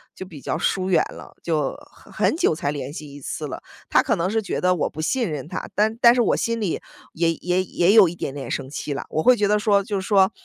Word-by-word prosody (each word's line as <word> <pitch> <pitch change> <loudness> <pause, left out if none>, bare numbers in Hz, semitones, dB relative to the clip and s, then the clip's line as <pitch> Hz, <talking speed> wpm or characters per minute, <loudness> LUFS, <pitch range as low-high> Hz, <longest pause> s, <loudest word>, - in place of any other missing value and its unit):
就 - - -7
比 170 -6 -11
较 - - -3
疏 185 -1 0
远 - - +4
了， - - -12
就 155 -5 -1 0.2
很 - - -18
很 315 - +1
久 355 - +2
才 145 -2 -2
联 145 0 -5
系 150 -3 -8
一 145 - -10
次 - - -5
了。 - - -7 0.3
他 - - +5
可 - - +1
能 170 +2 -1
是 220 +2 0
觉 200 - -3
得 180 0 +3
我 165 - -1
不 155 - -7
信 235 +6 0
任 150 -3 -5
他， - - -5
但 220 +2 +1
但 235 -2 +7
是 245 - +2
我 - - +2
心 230 0 -1
里 190 -6 -1 0.3
也 165 0 +1
也 180 +3 0
也 185 +1 +2
有 215 -5 +8
一 170 - -5
点 135 - -4
点 140 -1 -6
生 130 -2 -3
气 145 0 -4
了。 - - -4
我 155 - -1
会 255 - +6
觉 205 -3 +1
得 210 +1 +3
说， 205 -2 +3
就 200 -1 -2
是 190 - -6
说， 195 -2 +4
185 Hz, 295 characters per minute, -23 LUFS, 155-210 Hz, 0.3 s, 有